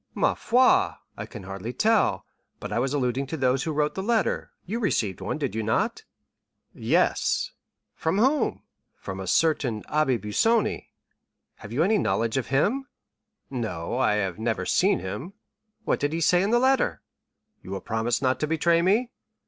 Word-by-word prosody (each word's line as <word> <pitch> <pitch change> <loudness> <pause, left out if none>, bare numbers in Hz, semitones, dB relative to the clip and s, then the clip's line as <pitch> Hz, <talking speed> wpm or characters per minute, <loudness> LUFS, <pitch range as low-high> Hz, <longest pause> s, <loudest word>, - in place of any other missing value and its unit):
"Ma - - +2
foi, 260 +11 +3 0.2
I - - -6
can 105 -6 -9
hardly 95 +4 -6
tell, 220 - +2 0.3
but - - -6
I - - +1
was 130 +2 0
alluding 135 -1 -1
to 160 - -4
those 130 -1 +1
who 160 - -2
wrote 150 0 0
the 190 - -4
letter; 225 +2 0 0.2
you 220 +6 -3
received 110 - -1
one, - - -3
did 140 -4 -3
you 110 - -2
not?" 110 0 -1 0.7
"Yes." - - +1 0.4
"From 160 +4 -1
whom?" 265 +5 +1 0.3
"From 95 0 -7
a 95 - -5
certain 130 - +1
Abbé 150 -5 +1
Busoni." 215 - +1 0.7
"Have 105 - -11
you 135 +7 +2
any 210 +3 +3
knowledge 115 -9 0
of 130 - -2
him?" 215 - +1 0.6
"No, 115 -7 -3
I 125 -4 +2
have 95 -3 -2
never 115 -1 -1
seen - - +3
him." 130 - -6 0.5
"What - - +1
did 145 +2 -1
he 165 - -1
say 175 +2 +4
in 195 - +1
the 240 - +4
letter?" 255 - +2 0.6
"You - - -12
will 95 0 -3
promise 115 +5 -1
not 130 0 +1
to 150 - 0
betray 165 +2 +2
me?" 215 +8 +2
140 Hz, 175 wpm, -26 LUFS, -, 0.7 s, say